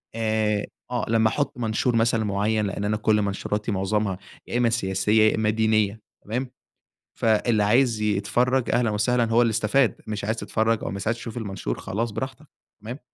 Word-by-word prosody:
آآ، 110 Hz, -2 st, 0 dB, 0.3 s
آه، 125 Hz, -, -1 dB
لمّا 110 Hz, -1 st, +3 dB
احط 145 Hz, +1 st, -2 dB
منشور 115 Hz, +1 st, 0 dB
مثلًا 115 Hz, -1 st, +2 dB
معيّن 105 Hz, +2 st, 0 dB
لإن 100 Hz, +1 st, -3 dB
أنا 105 Hz, +1 st, 0 dB
كل 105 Hz, 0 st, +2 dB
منشوراتي 105 Hz, +2 st, -2 dB
معظمها 100 Hz, 0 st, -1 dB, 0.3 s
يا -, -, -2 dB
إمّا 120 Hz, -1 st, +3 dB
سياسية 105 Hz, 0 st, +2 dB
يا -, -, -1 dB
إمّا 110 Hz, -1 st, +1 dB
دينية 110 Hz, -1 st, +1 dB, 0.2 s
تمام، 125 Hz, +4 st, -3 dB, 0.7 s
فاللي 110 Hz, -1 st, +2 dB
عايز 115 Hz, +1 st, +3 dB
يتفرّج 110 Hz, +5 st, +1 dB
أهلًا 120 Hz, -2 st, +2 dB
وسهلًا 115 Hz, +4 st, +1 dB
هو 115 Hz, +1 st, +5 dB
اللي 115 Hz, -2 st, +3 dB
استفاد، 115 Hz, +3 st, +1 dB
مش 105 Hz, -2 st, -4 dB
عايز 110 Hz, +2 st, -1 dB
تتفرّج 110 Hz, 0 st, 0 dB
أو -, -, -3 dB
مس 100 Hz, 0 st, -5 dB
عايز 115 Hz, +1 st, +1 dB
تشوف 115 Hz, 0 st, -7 dB
المنشور 95 Hz, -, -4 dB
خلاص 115 Hz, +3 st, -3 dB
براحتك 135 Hz, +7 st, -6 dB, 0.3 s
تمام، 120 Hz, +6 st, -7 dB
110 Hz, 175 wpm, -24 LUFS, 105-115 Hz, 0.7 s, هو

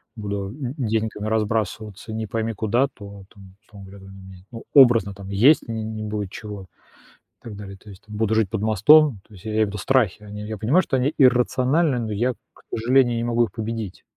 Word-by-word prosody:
буду 100 Hz, -3 st, -4 dB
д 130 Hz, 0 st, -6 dB
деньгами 110 Hz, -4 st, -2 dB
разбрасываться 110 Hz, -1 st, -2 dB
не 110 Hz, 0 st, -4 dB
пойми 115 Hz, 0 st, -2 dB
куда, 115 Hz, +5 st, +1 dB
то, 100 Hz, -2 st, -11 dB
там, 95 Hz, -3 st, -16 dB
условно 100 Hz, -3 st, -14 dB
говоря, 95 Hz, -1 st, -13 dB, 0.4 s
ну, 115 Hz, -1 st, -9 dB
образно, 120 Hz, -8 st, +6 dB
там, 100 Hz, 0 st, -11 dB
есть 120 Hz, +11 st, +4 dB
не 110 Hz, -1 st, -4 dB
будет 105 Hz, -2 st, -4 dB
чего 105 Hz, -3 st, -8 dB
и 95 Hz, -, -34 dB, 0.6 s
так 110 Hz, -3 st, -9 dB
далее. 100 Hz, -1 st, -9 dB
То 105 Hz, -, -16 dB
есть, 95 Hz, -, -15 dB
там, 105 Hz, -, -9 dB
буду 110 Hz, 0 st, 0 dB
жить 110 Hz, -4 st, +1 dB
под 105 Hz, +1 st, -3 dB
мостом. 110 Hz, +5 st, +5 dB
То 110 Hz, -, -19 dB
есть, 95 Hz, -, -16 dB
я 110 Hz, -, -4 dB
имею 110 Hz, 0 st, +2 dB
в -, -, -6 dB
виду 105 Hz, -, -6 dB
страхи. 110 Hz, -3 st, +1 dB
А 105 Hz, -, -12 dB
не 105 Hz, 0 st, -7 dB
Я 110 Hz, 0 st, -5 dB
понимаю, 120 Hz, -, +3 dB
что -, -, -2 dB
они 135 Hz, +4 st, 0 dB
иррациональны, 130 Hz, +3 st, +3 dB
но 110 Hz, -2 st, -3 dB
я, 120 Hz, +5 st, 0 dB, 0.2 s
к -, -, -22 dB
сожалению, 120 Hz, +1 st, +2 dB
не 115 Hz, -, -2 dB
могу 120 Hz, 0 st, +2 dB
их 110 Hz, -, -11 dB
победить. 110 Hz, -2 st, -5 dB
110 Hz, 210 wpm, -22 LUFS, 105-120 Hz, 0.6 s, образно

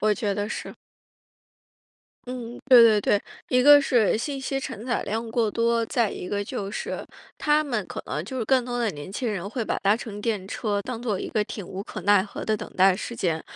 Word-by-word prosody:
我 215 Hz, 0 st, +3 dB
觉 200 Hz, -1 st, -1 dB
得 205 Hz, 0 st, -2 dB
是。 -, -, -6 dB, 1.5 s
嗯， 245 Hz, -1 st, -6 dB
对 250 Hz, -2 st, +9 dB
对 215 Hz, -2 st, +5 dB
对， 200 Hz, 0 st, +2 dB, 0.3 s
一 250 Hz, -, +3 dB
个 290 Hz, +2 st, +8 dB
是 235 Hz, -8 st, +3 dB
信 275 Hz, +4 st, -3 dB
息 270 Hz, 0 st, -2 dB
承 230 Hz, -2 st, -6 dB
载 245 Hz, -, 0 dB
量 225 Hz, +2 st, -3 dB
过 225 Hz, -1 st, +1 dB
多， 230 Hz, +1 st, +1 dB
再 235 Hz, -3 st, +1 dB
一 180 Hz, -, -6 dB
个 205 Hz, 0 st, -2 dB
就 200 Hz, -1 st, -4 dB
是， 210 Hz, -, -4 dB, 0.3 s
他 300 Hz, 0 st, +2 dB
们 235 Hz, -8 st, -2 dB
可 -, -, -5 dB
能 150 Hz, +5 st, -3 dB
就 260 Hz, +5 st, -5 dB
是 235 Hz, -, -1 dB
更 255 Hz, 0 st, +3 dB
多 245 Hz, -1 st, -3 dB
的 235 Hz, -, +1 dB
年 145 Hz, +4 st, -9 dB
轻 240 Hz, +2 st, -2 dB
人 195 Hz, -1 st, -4 dB
会 235 Hz, -1 st, -2 dB
把 -, -, -1 dB
搭 200 Hz, +2 st, +4 dB
乘 210 Hz, -3 st, -7 dB
电 205 Hz, -4 st, -1 dB
车 205 Hz, -1 st, -2 dB
当 240 Hz, +1 st, -6 dB
作 210 Hz, -6 st, -1 dB
一 -, -, -4 dB
个 215 Hz, -, +1 dB
挺 205 Hz, -2 st, -7 dB
无 190 Hz, +2 st, -6 dB
可 -, -, -7 dB
奈 205 Hz, -1 st, +5 dB
何 200 Hz, -, -7 dB
的 215 Hz, -1 st, +1 dB
等 -, -, -8 dB
待 190 Hz, 0 st, +6 dB
时 235 Hz, +5 st, -6 dB
间， 165 Hz, -6 st, -1 dB
220 Hz, 245 characters per minute, -25 LUFS, 200-245 Hz, 1.5 s, 对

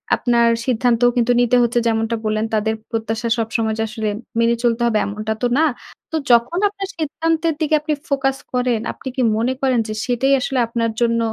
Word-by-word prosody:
আপনার 235 Hz, -1 st, +2 dB, 0.2 s
সিদ্ধান্তও 245 Hz, -1 st, +2 dB
কিন্তু 240 Hz, +1 st, +3 dB
নিতে 245 Hz, 0 st, +3 dB
হচ্ছে 240 Hz, +1 st, +1 dB
যেমনটা 225 Hz, 0 st, 0 dB
বললেন 215 Hz, 0 st, 0 dB
তাদের 220 Hz, +1 st, +1 dB, 0.2 s
প্রত্যাশা 225 Hz, 0 st, -2 dB
সবসময় 225 Hz, -1 st, -1 dB
যে -, -, +1 dB
আসলে 215 Hz, 0 st, -3 dB, 0.3 s
মেনে 230 Hz, 0 st, +3 dB
চলতে 235 Hz, 0 st, +1 dB
হবে 220 Hz, -, +1 dB
এমনটা 215 Hz, +2 st, -3 dB
তো 245 Hz, -, +2 dB
না। 315 Hz, -, +4 dB, 0.5 s
তো -, -, -2 dB, 0.2 s
যখন 240 Hz, +9 st, +3 dB
আপনার 395 Hz, -1 st, -6 dB
সিদ্ধান্তের 325 Hz, +1 st, 0 dB
দিকে 310 Hz, -1 st, +2 dB
আপনি 305 Hz, 0 st, -1 dB
ফোকাস 270 Hz, -1 st, 0 dB, 0.2 s
করেন, 245 Hz, -3 st, +1 dB
আপনি -, -, -11 dB
কি 260 Hz, -, 0 dB, 0.2 s
মনে 240 Hz, +3 st, 0 dB
করেন 260 Hz, -3 st, +2 dB
যে 215 Hz, -, -4 dB
সেটাই 260 Hz, +3 st, +1 dB
আসলে 260 Hz, 0 st, -1 dB
আপনার 230 Hz, -1 st, -1 dB
জন্য 230 Hz, -1 st, +2 dB
235 Hz, 185 wpm, -20 LUFS, 225-265 Hz, 0.5 s, না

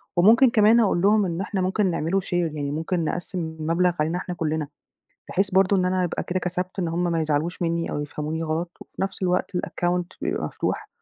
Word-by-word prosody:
وممكن 225 Hz, +8 st, +6 dB
كمان 220 Hz, +1 st, +5 dB
أقول 200 Hz, -6 st, +2 dB
لهم 205 Hz, +1 st, +4 dB
إن 170 Hz, 0 st, -2 dB
إحنا 195 Hz, -1 st, -2 dB
ممكن 190 Hz, +1 st, +1 dB
نعمله 170 Hz, +4 st, 0 dB
share 185 Hz, -, -7 dB
يعني 155 Hz, -5 st, -1 dB
ممكن 165 Hz, +3 st, -1 dB
نقسِّم 180 Hz, +3 st, -3 dB, 0.2 s
المبلغ 170 Hz, +3 st, +2 dB
علينا 160 Hz, +3 st, +1 dB
إحنا 180 Hz, 0 st, -5 dB
كلّنا، 155 Hz, -2 st, -1 dB, 0.6 s
بحيث 195 Hz, +2 st, +1 dB
برضه 190 Hz, +1 st, +4 dB
إن 185 Hz, -, +2 dB
أنا 185 Hz, 0 st, +1 dB
يبقى 175 Hz, -, -2 dB
كده 185 Hz, -, -1 dB
كسبت 180 Hz, +1 st, -3 dB
إن 175 Hz, -3 st, 0 dB
هُم 170 Hz, +2 st, -1 dB
ما 165 Hz, -, +1 dB
يزعلوش 155 Hz, +3 st, -1 dB
منّي 170 Hz, 0 st, -1 dB
أو -, -, -2 dB
يفهموني 150 Hz, +2 st, -4 dB
غلط 165 Hz, +2 st, -2 dB
وفي -, -, -8 dB
نفس 195 Hz, 0 st, -3 dB
الوقت 180 Hz, 0 st, 0 dB
الaccount 175 Hz, 0 st, -1 dB, 0.2 s
بيبقى -, -, -1 dB
مفتوح -, -, -3 dB
180 Hz, 200 wpm, -24 LUFS, 165-190 Hz, 0.6 s, وممكن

